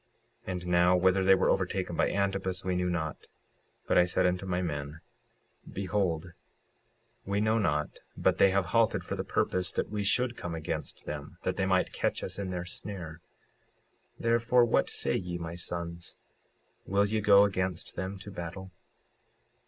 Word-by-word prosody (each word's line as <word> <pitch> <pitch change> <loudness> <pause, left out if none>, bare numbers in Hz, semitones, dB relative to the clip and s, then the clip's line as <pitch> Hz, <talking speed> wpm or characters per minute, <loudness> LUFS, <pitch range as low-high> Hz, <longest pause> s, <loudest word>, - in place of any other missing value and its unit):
56:43 - - -2
And 90 -1 -5
now, 90 +1 +4
whether 95 +1 +3
they 95 0 +6
were - - +2
overtaken - - -1
by - - +2
Antipus 95 -2 -1
we 90 -1 0
knew 90 0 0
not, 80 -3 -3 0.6
but - - +4
I 90 - +6
said 90 +1 +1
unto 90 +1 0
my 90 -1 0
men: 75 -3 -4 0.7
Behold, 90 -3 -1 0.9
we 100 +1 -1
know 110 +2 +2
not 75 -7 -1 0.2
but - - +2
they 95 - +7
have 95 -1 +1
halted 115 -1 +3
for - - -4
the - - -3
purpose 90 -1 0
that - - -2
we 105 -1 -1
should 120 +4 +1
come 85 -5 -5
against 80 -1 -5
them, 75 +2 -6
that 95 - -1
they 95 0 0
might 95 -1 +2
catch - - -1
us 95 +2 -4
in 100 -2 -3
their 90 -1 -3
snare; 90 -3 -6 1.0
56:44 - - -12
Therefore 115 +1 +4
what 115 - +2
say 70 - 0
ye, 90 -1 -3
my 85 -1 -5
sons, 85 0 -5 0.7
will 100 +1 +3
ye 110 +1 0
go 100 -1 +7
against 95 -3 -2
them 95 +2 -4
to 100 +2 -9
battle? 95 +1 -7
90 Hz, 175 wpm, -30 LUFS, 85-100 Hz, 1.0 s, they